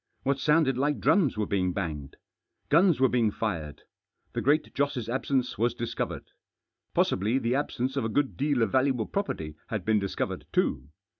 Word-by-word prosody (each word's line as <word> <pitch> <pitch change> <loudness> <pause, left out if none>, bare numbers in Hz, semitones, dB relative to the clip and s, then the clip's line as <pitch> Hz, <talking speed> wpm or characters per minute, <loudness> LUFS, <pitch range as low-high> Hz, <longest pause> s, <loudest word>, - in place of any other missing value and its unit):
What 140 0 0
sounded 150 -4 +3
like 145 +1 +1
drums 155 - +3
were 105 - 0
being 90 -3 0
banged. 75 -8 -4 0.5
Guns 170 -1 +4
were 130 - +5
being 120 -3 +2
fired. 85 -9 -4 0.5
The - - -1
Great 150 +4 +2
Joss' 140 -5 -1
absence 130 -1 -1
was 120 +1 +1
discovered. 120 -1 -4 0.7
Possibly 105 +7 +2
the 120 -2 0
absence 135 -2 -1
of 135 - 0
a - - -1
good 140 +4 0
deal 140 -3 +1
of 105 - 0
valuable 130 -4 +2
pro 200 - 0
perty 80 - -5
had 105 -5 -4
been 110 -1 +3
discovered 100 -1 -3
too. 65 +1 0
125 Hz, 170 wpm, -28 LUFS, 105-140 Hz, 0.7 s, were